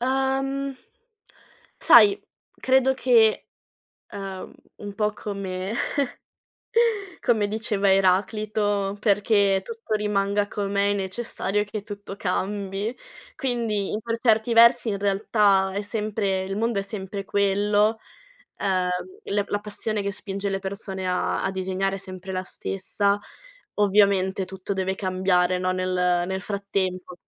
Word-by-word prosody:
Uhm, 270 Hz, +1 st, 0 dB, 1.0 s
sai, 405 Hz, 0 st, +7 dB, 0.4 s
credo 265 Hz, 0 st, +3 dB
che, 230 Hz, -4 st, +3 dB, 0.7 s
uhm, 195 Hz, -2 st, -7 dB, 0.2 s
un 205 Hz, -1 st, -7 dB
po' 210 Hz, -1 st, 0 dB
come 195 Hz, -1 st, -4 dB, 1.5 s
come 220 Hz, -5 st, +2 dB
diceva 210 Hz, -2 st, +1 dB
Eraclito: 205 Hz, +1 st, +1 dB
"Perché 200 Hz, -2 st, +3 dB
tutto 230 Hz, 0 st, -5 dB
rimanga 205 Hz, -1 st, 0 dB
com'è 200 Hz, 0 st, 0 dB
è -, -, +2 dB
necessario 200 Hz, 0 st, -2 dB
che 205 Hz, 0 st, -6 dB
tutto 205 Hz, -1 st, -8 dB
cambi". 200 Hz, +4 st, -2 dB, 0.4 s
Quindi, 230 Hz, -6 st, -1 dB
in 215 Hz, -, -2 dB
per 230 Hz, +1 st, -3 dB
certi 225 Hz, 0 st, +3 dB
versi, 235 Hz, 0 st, +6 dB
in 200 Hz, -, -2 dB
realtà, 200 Hz, -1 st, +2 dB
è 200 Hz, -, -1 dB
sempre 205 Hz, -2 st, -2 dB
il 195 Hz, +1 st, -4 dB
mondo 230 Hz, -1 st, 0 dB
è 195 Hz, -, 0 dB
sempre 195 Hz, 0 st, -6 dB
quello, 205 Hz, +2 st, +2 dB, 0.6 s
uhm, 185 Hz, -2 st, +1 dB, 0.4 s
la 205 Hz, 0 st, 0 dB
la 205 Hz, -, 0 dB
passione 210 Hz, 0 st, -3 dB
che 200 Hz, -, -1 dB
spinge 200 Hz, 0 st, -4 dB
le 195 Hz, -, -1 dB
persone 190 Hz, -1 st, -5 dB
a 180 Hz, 0 st, 0 dB
a -, -, +1 dB
disegnare 190 Hz, +1 st, -1 dB
è -, -, -7 dB
sempre 185 Hz, 0 st, -8 dB
la 185 Hz, -, -2 dB
stessa. 200 Hz, +2 st, -1 dB, 0.6 s
Ovviamente 200 Hz, -2 st, +3 dB
tutto 190 Hz, +1 st, -6 dB
deve 190 Hz, 0 st, -1 dB
cambiare, 185 Hz, -1 st, +1 dB
no, 185 Hz, 0 st, 0 dB
nel 180 Hz, -1 st, +1 dB
nel 190 Hz, 0 st, -3 dB
frattempo. 190 Hz, -2 st, -3 dB
200 Hz, 125 wpm, -24 LUFS, 190-215 Hz, 1.5 s, sai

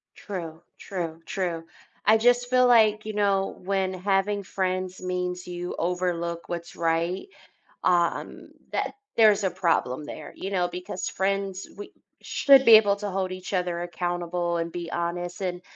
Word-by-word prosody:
True, 170 Hz, -5 st, -7 dB, 0.2 s
true, 170 Hz, -4 st, -5 dB
true. 170 Hz, -4 st, -3 dB, 0.4 s
I 215 Hz, +1 st, +6 dB
just 245 Hz, +2 st, +3 dB
feel 255 Hz, 0 st, +5 dB
like, 215 Hz, -3 st, +5 dB
you 215 Hz, -, -4 dB
know, 200 Hz, -2 st, +1 dB
when 190 Hz, -1 st, 0 dB
having 195 Hz, +2 st, 0 dB
friends 185 Hz, -1 st, -2 dB
means 180 Hz, 0 st, -3 dB
you 175 Hz, 0 st, -5 dB
overlook 170 Hz, -1 st, -2 dB
what's 170 Hz, -1 st, -6 dB
right, 170 Hz, -, 0 dB, 0.6 s
um, 175 Hz, -1 st, 0 dB, 0.2 s
that -, -, -1 dB, 0.2 s
there's 215 Hz, -3 st, +5 dB
a 190 Hz, -, +2 dB
problem 165 Hz, -6 st, 0 dB
there, 150 Hz, 0 st, -8 dB
you 195 Hz, -, -5 dB
know, 180 Hz, -3 st, +1 dB
because 180 Hz, +2 st, -5 dB
friends 195 Hz, 0 st, -2 dB
we 205 Hz, -, -9 dB, 0.3 s
should 275 Hz, -2 st, +5 dB
be 230 Hz, -, +7 dB
able 205 Hz, -2 st, +4 dB
to 205 Hz, 0 st, -4 dB
hold 190 Hz, -1 st, -1 dB
each 185 Hz, +1 st, -7 dB
other 180 Hz, -2 st, -1 dB
accountable 175 Hz, 0 st, -2 dB
and 170 Hz, 0 st, -2 dB
be 170 Hz, -1 st, -5 dB
honest, 175 Hz, +1 st, -3 dB
and 180 Hz, -1 st, -3 dB
185 Hz, 150 wpm, -26 LUFS, 175-200 Hz, 0.6 s, be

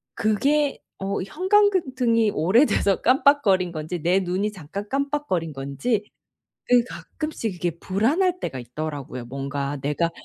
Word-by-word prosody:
그게 280 Hz, +7 st, +1 dB, 0.2 s
어 195 Hz, +1 st, -2 dB
형광등이 265 Hz, -, +2 dB
오래돼서 200 Hz, -, +3 dB
깜빡거린 250 Hz, -9 st, +3 dB
건지 160 Hz, +2 st, -4 dB
내 180 Hz, +3 st, +3 dB
눈이 190 Hz, +3 st, -1 dB
잠깐 195 Hz, +2 st, -7 dB
깜빡거린 275 Hz, -, -1 dB
건지 145 Hz, -, -2 dB, 0.6 s
그 245 Hz, -1 st, +5 dB
가끔씩 280 Hz, -6 st, -5 dB
이게 175 Hz, 0 st, -1 dB
불안할 310 Hz, -, +1 dB
때가 130 Hz, -5 st, -4 dB
있더라고요. 130 Hz, 0 st, -6 dB
뭔가 140 Hz, +2 st, -3 dB
내가 150 Hz, +4 st, 0 dB
200 Hz, 280 characters per minute, -24 LUFS, -, 0.6 s, 그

